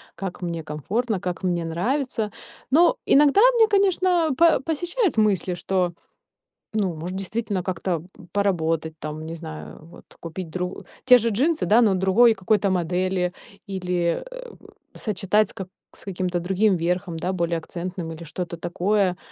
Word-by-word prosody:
как 190 -2 -6
мне 170 -2 -3
комфортно, 195 - -2
как 180 +1 -4
мне 175 -2 0
нравится. 220 - -1 0.4
Но 345 - +5
иногда 290 +5 +5 0.2
мне, 450 -2 +5
конечно, 370 -5 +3
по 335 -1 +5
посещают 345 - 0
мысли, 200 -5 +2
что, 180 0 -1 0.8
ну, 200 -5 0
может, 175 +4 -5
действительно 195 0 -2
как-то 175 -2 -2 0.3
поработать, 165 -5 0
там, 155 +1 -6
не 165 +1 -6
знаю, 160 -2 -9
вот 170 - -15 0.2
купить 165 +1 -7
дру 180 +2 -4 0.2
те 250 -1 +8
же 230 -1 0
джинсы, 290 +10 +1
да, 220 +4 +5
но 215 -4 +4
другой 190 +6 +5
какой-то 205 0 +1
модели, 180 0 0 0.4
или, 180 -3 -1
э, - - -9
у - - -17 0.4
сочетать 210 -1 +1
с - - -19
ка 190 - -7 0.2
с - - -10
каким-то 185 -2 -2
другим 190 +3 +2
верхом, 175 0 -2
да, 180 +3 -2
более 170 -2 0
акцентным, 175 +1 -5
или 165 +1 -8
что-то 170 +2 -5
такое. 180 +2 0
185 Hz, 150 wpm, -24 LUFS, 175-220 Hz, 0.8 s, те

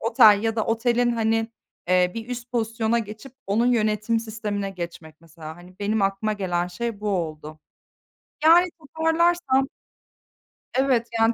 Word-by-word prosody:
otel 220 -3 +5
ya 225 0 -1
da 220 - +1
otelin, 240 +1 +1
hani, 225 0 +1 0.4
eee, 180 0 +3
bir 230 +1 -6
üst 245 0 -6
pozisyona 230 0 0
geçip 220 +4 -8
onun 215 +5 +1
yönetim 220 -1 +1
sistemine 210 -3 -4
geçmek 170 -3 -8
mesela. 160 -1 -11
Hani, 180 +1 -16
benim 205 +1 0
aklıma 195 +2 0
gelen 180 -4 -1
şey 205 +4 -5
bu 210 - -3
oldu. 155 -5 -4 0.8
Yani 340 +3 +7
toparlarsam 320 -2 +1 1.1
Evet, 255 -4 +2
yani 225 +1 +4
220 Hz, 140 wpm, -24 LUFS, 195-240 Hz, 1.1 s, Yani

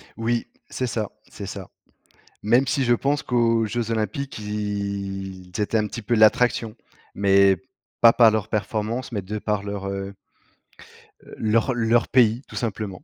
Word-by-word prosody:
Oui. 115 +1 -1 0.2
C'est 130 - -2
ça 110 -3 -2 0.2
c'est - - -8
ça. - - -7 0.8
Même 120 +6 +3
si 135 +1 +1
je 120 - +3
pense 140 +4 0
qu'aux 115 -2 +2
Jeux 115 +1 -3
Olympiques 115 +5 -3
ils 100 -3 -4
étaient 105 +2 0
un 105 - 0
petit 115 +2 -7
peu 105 +4 0
l'attraction, 110 0 +3 0.4
mais 100 -1 +4 0.5
pas 115 - +9
par 115 -2 +6
leur 110 -1 -1
performance, 110 +3 -2
mais 105 -3 -2
de 105 +4 -5
par 105 -1 -1
leur, 100 -1 -5
heu 100 0 -5 1.2
leur 115 +4 +1
leur 120 0 +2
pays, 120 0 +3
tout - - -12
simplement. 105 -4 -4
110 Hz, 150 wpm, -23 LUFS, 100-120 Hz, 1.2 s, pas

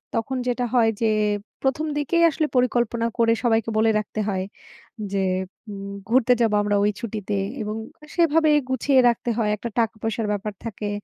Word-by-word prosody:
তখন 240 +4 -1
যেটা 245 0 0
হয় 230 -2 +4
যে 225 - +3 0.5
১ম 270 +4 0
দিকেই 335 +4 +2
আসলে 310 0 -1
পরিকল্পনা 240 -2 +1
করে 230 -1 +4
সবাইকে 225 -1 +2
বলে 220 0 +4
রাখতে 215 +1 -5
হয় 190 -1 -1 0.7
যে, 195 -1 0 0.5
উম 200 -1 -7 0.2
ঘুরতে 250 0 +4
যাবো 220 -2 +3
আমরা 205 0 +1
ওই 210 - +3
ছুটিতে 210 -3 -3 0.2
এবং 215 0 -3 0.3
আ - - -10
সেভাবেই 315 -2 +4
গুছিয়ে 260 +1 +3
রাখতে 235 +1 -2
হয়। 215 -2 +1
একটা 235 +3 -6
টাকা-পয়সার 225 -1 -1
ব্যাপার 210 0 -3
থাকে। 210 -2 -4
230 Hz, 165 wpm, -23 LUFS, 210-255 Hz, 0.7 s, হয়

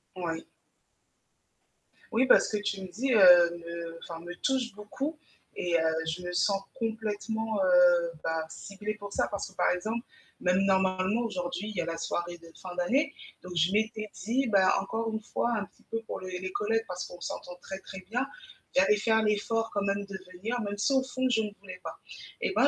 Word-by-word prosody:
Oui. 165 -3 -3 1.7
Oui, 240 +4 +4
bah, - - +9
ce 215 - -2
que 205 - 0
tu 205 -1 -2
me 190 - -5
dis, 250 +7 0
heu, 175 -4 +8
me 170 0 -6
enfin, 165 -1 -7
me 175 +1 -7
touche 255 +3 0
beaucoup 270 +9 -4 0.4
et 175 -1 0
heu, 160 -1 +3
je 160 +3 -2
me 180 0 -4
sens 195 +2 +2
complètement, 220 -2 -2
heu, 175 -2 +6
bah, 160 -1 -1
ciblée 205 +4 -5
pour 205 -1 -8
ça. - - +1
Parce 200 -1 -4
que, 190 - -20
par - - +3
exemple, 220 +7 -2 0.3
même 180 +1 +3
normalement 190 +2 +2
aujourd'hui, 185 -2 -3
il 215 - -7
y 175 - +1
a - - -3
la 165 0 -3
soirée 175 +1 -2
de 165 -1 -15
fin 180 -1 -7
d'année. 270 - +2 0.3
Donc 180 0 -7
je 170 +3 +3
m'étais 215 0 0
dit, 250 +5 +1
bah, 195 -4 +5
encore 225 +3 -2
une 220 0 -2
fois, 235 +2 -1
un 205 - -2
petit - - -26
peu 225 0 -1
pour 220 - -5
les 185 -1 -5
les 185 0 -4
collègues 225 +3 0
parce 180 0 -4
qu'on 175 - -11
s'entend 175 +1 -5
très 190 0 -6
très 190 0 -9
bien, 250 +4 +1 0.5
j'avais 195 +3 +5
fait 220 +2 +2
l'effort 225 +2 +1
quand 200 - +1
même 200 0 0
de 195 -1 -6 0.2
venir, 225 +7 -2
même 205 -1 -3
si 240 +7 +2
au 265 -1 +4
fond, 260 0 -1
je 225 -3 +3
ne 210 -1 -3
voulais 185 -2 -9
pas. - - -6 0.4
Et - - +1
ben, - - +6
200 Hz, 205 wpm, -29 LUFS, 180-220 Hz, 1.7 s, bah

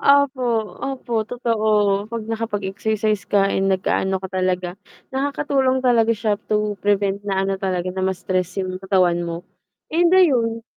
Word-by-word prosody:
Opo. 280 -1 +4 0.4
Opo, 265 -3 -5 0.2
totoo. 215 -4 +1
'Pag 230 0 -4
nakapag-exercise 215 -1 -2
ka, 195 -1 +3
eh, - - 0
nag-aano 190 0 +1
ka 190 - -5
talaga. 180 -1 0 0.4
Nakakatulong 265 -1 0
talaga 230 -2 +4
siya 210 -1 -1
to 210 -1 0
prevent 200 -1 +1
na 195 0 +1
ano 195 0 -2
talaga, 185 -1 -1
na 190 - -4
ma-stress 185 -1 -1
yung 185 0 -5
katawan 185 -3 +2
mo. 170 -1 -3 0.6
And 340 +1 +4
ayun 235 -10 +3
205 Hz, 140 wpm, -21 LUFS, 190-230 Hz, 0.6 s, Opo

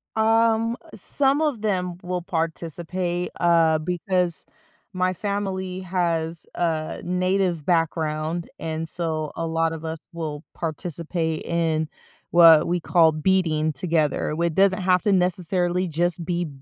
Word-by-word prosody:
Um, 225 +1 +2 0.2
some 280 +2 +2
of 290 -8 0
them 180 -5 -1
will 180 0 -3
participate, 175 +2 -3
uh, 165 -2 +4
because 180 +1 -1 0.5
my 185 0 +1
family 190 -1 -3
has 170 -3 -2
a 160 -2 -1
Native 180 -2 0
background, 165 0 0
and 160 0 -4
so, 155 -3 -2
a 165 - -2
lot 165 0 0
of 160 0 -7
us 160 0 -4
will 155 -3 -5
participate 165 0 -3
in 160 -2 0 0.4
what 165 -2 +7
we 175 +1 0
call 165 -1 +4
beading 155 -1 +1
together, 155 0 0
with 170 +1 +1
it 165 - -4
doesn't 195 0 +3
have 180 -1 +3
to 210 - +2
necessarily 180 0 +1
just 170 +1 -1
be 175 -1 -1
175 Hz, 130 wpm, -24 LUFS, 160-185 Hz, 0.5 s, what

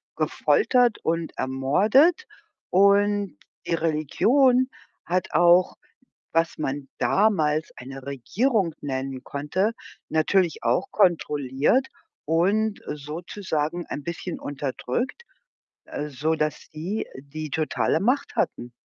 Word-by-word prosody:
gefoltert 250 - +2
und 165 0 -2
ermordet. 210 - +3 0.4
Und 200 -2 +3 0.3
die - - -1
Religion 245 - +2 0.4
hat 180 +1 -1
auch, 175 +2 +5 0.6
was 165 0 +1
man 140 -1 -3
damals 160 -7 +2
eine 135 +2 -9
Regierung 185 - 0
nennen 135 -1 -4
konnte, 175 +10 -1 0.4
natürlich 165 +1 +1
auch 120 +1 +1
kontrolliert 150 - +2 0.4
und 200 +7 +1
sozusagen 160 +2 -4
ein 145 - -5
bisschen 170 +1 -5
unterdrückt, 145 - -4 0.6
äh, 150 - -5
sodass 150 +2 -2
sie, 175 +8 -4
die 150 +2 -7
totale 155 0 0
Macht 255 +7 0
hatten. 120 0 -1
165 Hz, 95 wpm, -25 LUFS, 145-205 Hz, 0.6 s, auch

